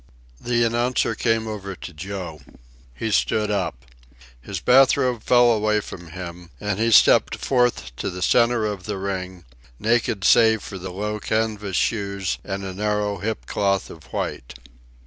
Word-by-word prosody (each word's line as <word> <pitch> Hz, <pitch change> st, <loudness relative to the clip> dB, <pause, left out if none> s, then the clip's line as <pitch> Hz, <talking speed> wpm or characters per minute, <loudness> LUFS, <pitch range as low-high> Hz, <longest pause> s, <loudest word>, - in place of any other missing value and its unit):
The 120 Hz, -1 st, +1 dB
announcer 120 Hz, +2 st, +1 dB
came 115 Hz, -1 st, 0 dB
over 100 Hz, -3 st, -5 dB
to 85 Hz, -, -9 dB
Joe. 85 Hz, -2 st, -6 dB, 0.5 s
He 110 Hz, -, -3 dB
stood 105 Hz, 0 st, +1 dB
up. 100 Hz, -10 st, -2 dB, 0.6 s
His -, -, -5 dB
bath 135 Hz, +2 st, +5 dB
robe 125 Hz, -4 st, 0 dB
fell 120 Hz, 0 st, +5 dB
away 105 Hz, -1 st, +2 dB
from 85 Hz, -4 st, -9 dB
him, 85 Hz, 0 st, -8 dB
and 105 Hz, -1 st, -2 dB
he 115 Hz, +1 st, +2 dB
stepped -, -, +6 dB
forth 125 Hz, -, 0 dB
to -, -, -2 dB
the 90 Hz, +1 st, -5 dB
centre 115 Hz, +1 st, +3 dB
of 100 Hz, -3 st, -4 dB
the 105 Hz, -2 st, -3 dB
ring, 95 Hz, -2 st, -5 dB, 0.3 s
naked 110 Hz, -, 0 dB
save 110 Hz, -1 st, +5 dB
for 95 Hz, -, -7 dB
the 95 Hz, +1 st, -6 dB
low 105 Hz, +3 st, -3 dB
canvas 105 Hz, -3 st, -1 dB
shoes 100 Hz, -4 st, -1 dB
and 100 Hz, 0 st, -4 dB
a 95 Hz, -1 st, -5 dB
narrow 105 Hz, +1 st, -1 dB
hip 110 Hz, +3 st, -3 dB
cloth 100 Hz, -2 st, 0 dB
of 80 Hz, -, -13 dB
white. 60 Hz, -, -5 dB
105 Hz, 160 wpm, -23 LUFS, 95-115 Hz, 0.6 s, stepped